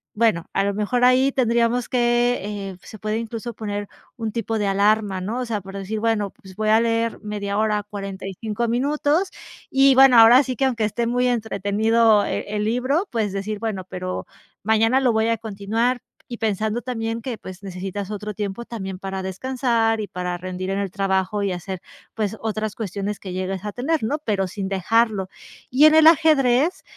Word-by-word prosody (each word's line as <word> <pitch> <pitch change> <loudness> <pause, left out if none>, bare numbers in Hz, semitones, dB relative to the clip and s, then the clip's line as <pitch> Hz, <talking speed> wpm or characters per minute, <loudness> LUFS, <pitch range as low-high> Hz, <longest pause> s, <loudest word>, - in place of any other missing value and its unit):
bueno, 210 -7 +2
a - - +2
lo 200 0 -1
mejor 215 +4 0
ahí 255 +2 +4
tendríamos 235 -1 +1
que 240 0 +2
eh, 200 -2 -5
se 215 - -11
puede 215 +1 -2
incluso 230 0 -5
poner 205 -2 -4 0.3
un 225 -3 -4
tipo 225 0 -2
de 205 - 0
alarma, 200 -1 +2
¿no?, 215 +7 -3
o 255 - -2
sea, 220 -3 -3
por 195 +1 -10
decir 200 +3 -4
bueno, 220 -2 0
pues 190 -1 -16
voy 215 +1 -1
a 220 +1 +6
leer 230 0 0
media 205 -1 -3
hora, 215 -1 +1
45 200 +2 -4
minutos 290 +8 +1 0.4
y 270 0 +5
bueno, 265 -2 +7
ahora 235 +3 +8
sí 255 -2 -4
que 270 - +1
aunque 240 -4 0
esté 220 +3 -1
muy 245 +1 +1
entretenido 220 -1 +2
e - - -2 0.2
el 210 - 0
libro, 255 - 0
pues 220 -5 -1
decir: 200 +1 -3
"Bueno, 205 -4 -3
pero 185 0 -4 0.4
mañana 225 +4 +3
lo 260 -2 +3
voy 220 +1 +2
a 230 - +1
continuar", 225 +3 -1 0.3
y 240 - -6
pensando 220 +1 -1
también 230 -2 -3
que 240 -1 -4
pues 185 -1 -10
necesitas 195 +1 -5
otro 210 0 -5
tiempo 205 +2 -4
también 195 -6 -6
para 190 0 -5
descansar 230 +2 0
y 210 - -3
para 180 -1 -4
rendir 185 +1 -5
en 195 +1 -1
el 200 -1 -2
trabajo 195 +1 0
y 200 - 0
hacer, 180 +1 -5 0.3
pues 215 -1 -2
otras 215 -1 -3
cuestiones 205 -1 -4
que 185 -2 -7
llegues 185 +1 -3
a 210 - -3
tener, 295 +4 -1
¿no?, 285 +8 -1
pero 205 -9 -1
sin 190 +1 -5
dejarlo. 200 +1 +1 0.4
Y 270 +5 +5
en 310 0 +7
el 315 0 +7
ajedrez, 300 -1 +4
220 Hz, 190 wpm, -22 LUFS, 200-240 Hz, 0.4 s, ahora